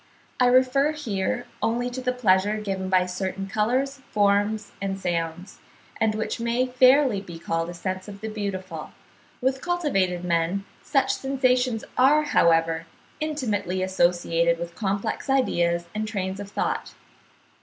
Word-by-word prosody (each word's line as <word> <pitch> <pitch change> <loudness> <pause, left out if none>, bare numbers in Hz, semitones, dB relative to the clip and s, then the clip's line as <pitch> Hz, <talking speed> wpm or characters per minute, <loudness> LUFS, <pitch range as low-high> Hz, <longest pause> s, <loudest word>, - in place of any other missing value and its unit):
I 250 - +5
refer 260 +4 +4
here 245 -4 -2 0.2
only 240 +2 0
to 255 +1 -5
the 250 0 0
pleasure 210 -4 +2
given 195 -3 -3
by 185 -1 +4
certain 190 +1 -3
colours, 255 +7 0
forms, 205 +1 +1
and 195 -1 -2
sounds, 175 +1 -3 0.4
and 220 -1 +2
which 220 +1 -3
may 235 +2 +1
fairly 255 -3 +4
be 175 -4 -9
called 165 0 -2
a 175 - -7
sense 185 +2 -4
of 200 -1 -9
the 220 - -4
beautiful; 190 -6 -5 0.5
with 265 +1 0
cultivated 195 - 0
men 170 +3 0 0.2
such 270 -2 +1
sensations 255 -3 +1 0.2
are, 290 +4 +5
however, 165 - +2 0.3
intimately 215 - -1
associated 175 -2 +2
with 170 0 -6
complex 200 +6 -2
ideas 175 -10 +2
and 215 0 -2
trains 190 -3 -3
of 200 -1 -7
thought. - - -2
205 Hz, 140 wpm, -25 LUFS, 185-250 Hz, 0.5 s, I